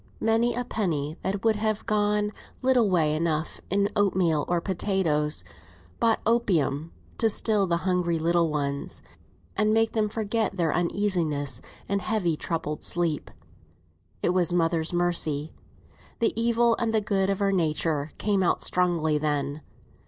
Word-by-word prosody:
Many 225 +2 +2
a 245 0 -2
penny 155 -10 -2
that 195 +3 -3
would 220 -2 +3
have 215 0 -1
gone 210 -1 +1 0.3
little 250 -5 +4
way 160 -5 +2
enough 160 0 -2
in 200 +1 +2
oatmeal 185 -7 +2
or 175 -1 +1
potatoes, 170 - 0 0.6
bought 225 -1 +2
opium 170 -10 +1 0.3
to 225 - +3
still 210 -2 +2
the 170 -1 +1
hungry 180 -2 +1
little 170 +1 +2
ones, 140 -2 -3 0.5
and 215 +1 +2
make 225 0 +3
them 215 -2 0
forget 220 -1 -1
their 165 -3 +1
uneasiness 170 -5 0 0.3
in 200 0 0
heavy 195 -6 0
troubled 150 -2 -3
sleep. 170 -3 -1 0.9
It - - +2
was 180 -1 +2
mother's 165 -2 +1
mercy. 165 -4 0 0.6
The 230 - +1
evil 235 0 +3
and 225 -1 0
the 215 - +3
good 195 -2 0
of 195 0 0
our 200 -1 +2
nature 160 -4 0
came 200 -2 +1
out 180 - +1
strongly 170 -4 +1
then. 145 -1 -1
180 Hz, 145 wpm, -26 LUFS, 160-210 Hz, 0.9 s, little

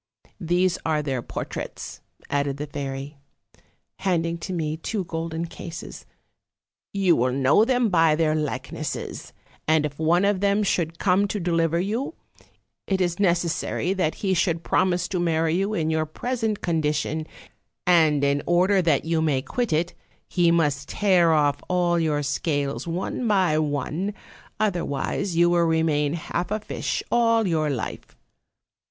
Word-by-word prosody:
These 180 +1 +1
are 155 -2 0
their 135 -4 -2
portraits,' - - -6 0.3
added 140 -1 -1
the 145 - -4
fairy, 140 0 -6 0.8
handing 170 -3 0
to 185 - -6
me 155 -3 -1
two 195 +5 -3
golden 165 0 -4
cases; 170 0 -9 0.8
'you 195 -4 +3
will 125 +2 +1
know 135 - +4
them 250 -2 +2
by 165 -4 +4
their 155 -1 +2
likenesses; 150 -2 -4 0.4
and 155 -1 +3
if 145 0 -6
one 170 +4 +3
of 200 -2 +2
them 200 +1 +2 0.3
come 195 +2 +2
to 205 - -3
deliver 165 -2 +1
you, 225 - -2 0.7
it 190 -1 0
is 175 -1 0
necessary 175 0 +1
that 180 -5 0
he 190 - +2
should 170 -2 +1
promise 180 -1 +1
to 185 - -1
marry 165 -2 +1
you 195 +4 0
in 160 -3 0
your 155 0 0
present 225 +4 -2
con 165 -2 0
dition; 155 +1 -1 0.6
and 160 -5 +4
in 140 0 +2
order 185 +3 +4
that 160 -5 +2
you 165 -1 +1
may 140 -5 +1
quit 245 - -2
it, 165 +3 0 0.3
he 175 -2 +2
must 150 -4 +1
tear 185 -5 +3
off 145 -2 +2
all 175 -1 +2
your 150 -3 0
scales 140 +2 -1
one 185 +8 -2
by 185 -7 +3
one, 155 +7 -2 0.4
otherwise 180 -2 -1
you 175 0 +5
will 175 0 +3
remain 160 -3 +1
half 170 +1 -3
a 215 +1 -1
fish 215 - -3
all 230 -2 +3
your 155 -3 +1
life. 130 -6 -5
165 Hz, 150 wpm, -24 LUFS, 155-185 Hz, 0.8 s, you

